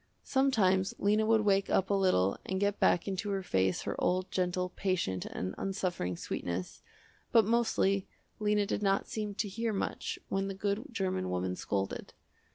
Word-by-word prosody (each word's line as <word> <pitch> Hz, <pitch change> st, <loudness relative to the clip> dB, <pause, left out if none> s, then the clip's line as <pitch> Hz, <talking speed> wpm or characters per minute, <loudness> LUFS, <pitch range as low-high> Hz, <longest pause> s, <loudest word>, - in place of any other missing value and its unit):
Sometimes 205 Hz, -9 st, +2 dB
Lena 210 Hz, +2 st, +2 dB
would 225 Hz, -1 st, +4 dB
wake 200 Hz, -2 st, +2 dB
up 190 Hz, +1 st, +2 dB
a -, -, +4 dB
little 185 Hz, -, +2 dB
and 190 Hz, 0 st, -2 dB
get 200 Hz, 0 st, +1 dB
back 175 Hz, -, +3 dB
into 200 Hz, +2 st, -2 dB
her 195 Hz, -1 st, -1 dB
face 95 Hz, -, +1 dB
her -, -, -2 dB
old, 185 Hz, +1 st, +1 dB
gentle, 180 Hz, 0 st, 0 dB
patient, 180 Hz, -, -1 dB
and 95 Hz, +1 st, -4 dB
unsuffering 180 Hz, -, -2 dB
sweetness, 90 Hz, +2 st, -4 dB, 0.5 s
but 225 Hz, -3 st, +6 dB
mostly 220 Hz, -4 st, +2 dB, 0.3 s
Lena 210 Hz, -1 st, +2 dB
did 200 Hz, -, -2 dB
not 195 Hz, -1 st, +1 dB
seem 210 Hz, -2 st, -4 dB
to 210 Hz, -, -1 dB
hear 225 Hz, +3 st, -2 dB
much 195 Hz, -, -2 dB
when 195 Hz, 0 st, -1 dB
the 195 Hz, -, -4 dB
good 200 Hz, +5 st, -1 dB
german 185 Hz, -, -1 dB
woman 90 Hz, 0 st, -1 dB
scolded. 95 Hz, +1 st, -3 dB
195 Hz, 165 wpm, -31 LUFS, 180-205 Hz, 0.5 s, but